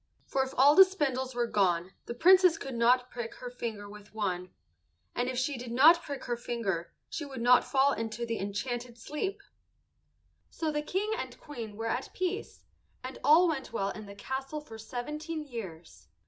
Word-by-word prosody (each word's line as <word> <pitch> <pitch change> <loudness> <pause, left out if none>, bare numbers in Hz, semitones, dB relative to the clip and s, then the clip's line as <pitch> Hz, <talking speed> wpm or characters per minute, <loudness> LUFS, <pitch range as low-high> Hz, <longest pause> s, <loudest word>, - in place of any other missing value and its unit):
For 270 - 0
if 265 0 -3
all 280 +3 +7
the 385 - +10
spindles 265 -9 -2
were 240 -1 +1
gone 185 -5 +1 0.2
the 235 - -4
Princess 365 +3 +6
could 270 -1 -6
not 245 +2 +3
prick 235 -2 -6
her 245 - -8
finger 225 -4 -5
with 210 +1 -13
one; 185 -4 -2 0.6
and 245 +1 -1
if 255 - -3
she 255 0 -1
did 240 -1 -7
not 315 +8 +7
prick 280 -4 -6
her 240 - -2
finger 205 -8 -3 0.2
she 320 - -5
would 275 -3 -7
not 245 +1 +5
fall 275 0 +3
into 225 +1 -3
the 230 -1 -3
enchanted 235 +4 -4
sleep. 300 - -4 1.1
So 320 -2 -2
the 295 0 -1
King 390 +8 -1
and - - -6
Queen 230 -8 -8
were 225 - -4
at 245 +3 -2
peace, 370 +3 -3 0.4
and 255 +1 -7
all 315 +6 +6
went 305 -5 -3
well 200 -3 -1
in 215 -1 -9
the 200 - -10
castle 265 +7 -4
for 225 -7 -11
seventeen 300 +8 -5
years. 190 - -9
250 Hz, 185 wpm, -30 LUFS, 225-295 Hz, 1.1 s, the